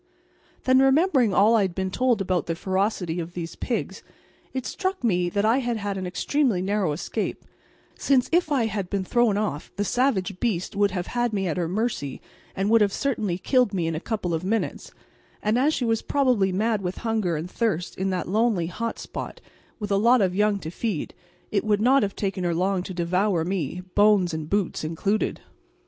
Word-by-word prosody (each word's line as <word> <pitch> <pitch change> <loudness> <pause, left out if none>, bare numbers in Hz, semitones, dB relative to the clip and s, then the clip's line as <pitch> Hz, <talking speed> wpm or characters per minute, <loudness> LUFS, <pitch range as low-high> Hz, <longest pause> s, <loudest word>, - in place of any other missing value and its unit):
Then, 260 0 +4
remembering 270 - +4
all 210 +4 +5
I 220 - +4
had 185 -3 -1
been 190 -1 -2
told 245 -1 +1
about 185 -2 0
the 165 - -1
ferocity 190 -2 -1
of 170 0 -5
these 170 -2 -5
pigs, - - -3 0.5
it 260 -1 -4
struck 375 -3 -3
me 180 -6 +2
that 200 +3 0
I 230 +4 +4
had 240 -3 -1
had 205 -1 -3
an 185 -1 -4
extremely 240 +3 +1
narrow 195 -2 0
escape, 150 - -3 0.5
since 265 -3 +3
if 340 -2 +2
I 260 -5 +2
had 200 -4 -3
been 200 -2 -1
thrown 225 +1 +2
off 205 -9 -3
the 205 - -1
savage 205 -7 0
beast 200 -7 -1
would 205 0 +3
have 180 -2 -3
had 240 -2 -1
me 195 -2 0
at 170 - -2
her 175 -2 0
mercy 185 - -2 0.4
and 195 +3 0
would 230 -1 +6
have 205 -1 +3
certainly 215 -8 -1
killed 250 0 +2
me 175 -3 0
in 165 - -1
a 155 - -2
couple 195 -3 -3
of 165 +1 -2
minutes; 220 +4 -2 0.5
and 215 +3 +2
as 285 +4 +3
she 255 - -1
was 225 -1 +1
probably 250 -9 +2
mad 215 +2 0
with 180 -1 -4
hunger 215 -7 0
and 165 +4 -5
thirst 195 -7 -1
in 190 +1 -1
that 185 -2 -2
lonely 210 -2 +1
hot 225 +7 -4
spot, - - -7 0.4
with 210 -2 -5
a 200 - +3
lot 235 +5 +5
of 190 -3 +2
young 210 +1 +2
to 160 - -6
feed, 200 -4 -3 0.4
it 200 - +1
would 210 -1 +2
not 260 +5 +4
have 200 -2 -1
taken 195 -2 -2
her 170 -1 0
long 185 +2 +1
to 185 - -7
devour 180 0 +1
me, 180 -2 -2
bones 205 -4 +4
and 160 -1 -4
boots 200 -5 -1
included. 195 +7 -1
200 Hz, 205 wpm, -25 LUFS, 180-230 Hz, 0.5 s, would